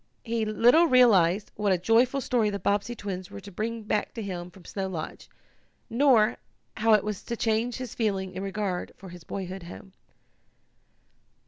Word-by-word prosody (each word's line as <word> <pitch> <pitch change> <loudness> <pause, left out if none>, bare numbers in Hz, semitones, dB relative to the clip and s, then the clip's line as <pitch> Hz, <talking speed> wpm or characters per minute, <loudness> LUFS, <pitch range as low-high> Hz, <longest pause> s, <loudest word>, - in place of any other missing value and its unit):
He 230 -1 -1
little 240 +10 +5
realized 210 - +4
what 205 -1 0
a 185 - +3
joyful 235 +8 +2
story 235 -4 +1
the 200 - -3
Bobbsey 205 +4 -1
twins 190 -4 -6
were - - -8
to 200 +1 -11
bring 225 +4 -4
back 210 +2 -2
to 225 - -4
him 180 -3 -5
from 180 -1 -17
Snow 195 -1 -4
Lodge, 165 -4 -6 0.6
nor 235 -3 +4 0.4
how 225 0 +4
it 210 - +4
was 210 -2 -4
to 235 - -5
change 225 +2 0
his 255 -3 -6
feeling 195 -4 -1
in 185 - -5
regard 195 -2 -3
for 190 - -11
his 175 -1 -11
boyhood 190 +1 -6
home. 180 +2 -11
210 Hz, 175 wpm, -27 LUFS, 190-230 Hz, 0.6 s, little